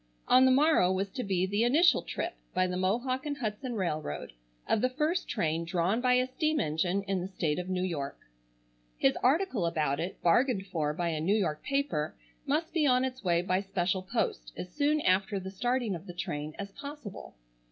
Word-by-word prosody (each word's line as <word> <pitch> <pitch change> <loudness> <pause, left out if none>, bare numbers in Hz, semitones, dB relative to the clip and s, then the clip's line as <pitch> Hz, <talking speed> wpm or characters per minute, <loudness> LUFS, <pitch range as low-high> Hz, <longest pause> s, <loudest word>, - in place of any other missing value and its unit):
On 255 +1 +6
the 260 - +5
morrow 275 - +4
was 190 +1 -1
to 250 - -4
be 185 -2 +1
the 205 +4 +1
initial 305 +9 +5
trip, 345 +1 -4 0.2
by 185 0 +3
the 180 0 -2
Mohawk 240 +8 0
and 285 -1 -2
Hudson 240 0 -3
Railroad, 155 - -3 0.3
of 215 - +2
the 255 - +2
first 305 +7 -1
train 160 +1 0
drawn 175 +6 0
by 250 0 +3
a 250 0 +3
steam 310 +4 0
engine 175 +5 0
in 195 -2 -1
the 180 - -3
state 170 -5 -1
of 180 +1 -5
New 185 -1 0
York. 150 -7 -3 0.8
His 135 - +3
article 265 - +2
about 150 -3 0
it, 175 +3 -4
bargained 195 +4 +3
for 160 -6 -1
by 175 0 -1
a 155 -2 -2
New 195 +7 +2
York 160 -7 -1
paper, 275 - -1 0.3
must 310 +4 0
be 315 -4 +3
on 255 0 +4
its 255 -2 -5
way 175 -2 +2
by 185 +1 +1
special 190 -1 -1
post - - -2
as 180 - -5
soon 300 +1 +2
after 195 0 +2
the 190 0 -7
starting 240 +1 0
of 175 +2 -7
the 175 - -8
train 150 -3 -4
as 200 0 -6
possible. 280 - -9
195 Hz, 200 wpm, -30 LUFS, 175-255 Hz, 0.8 s, On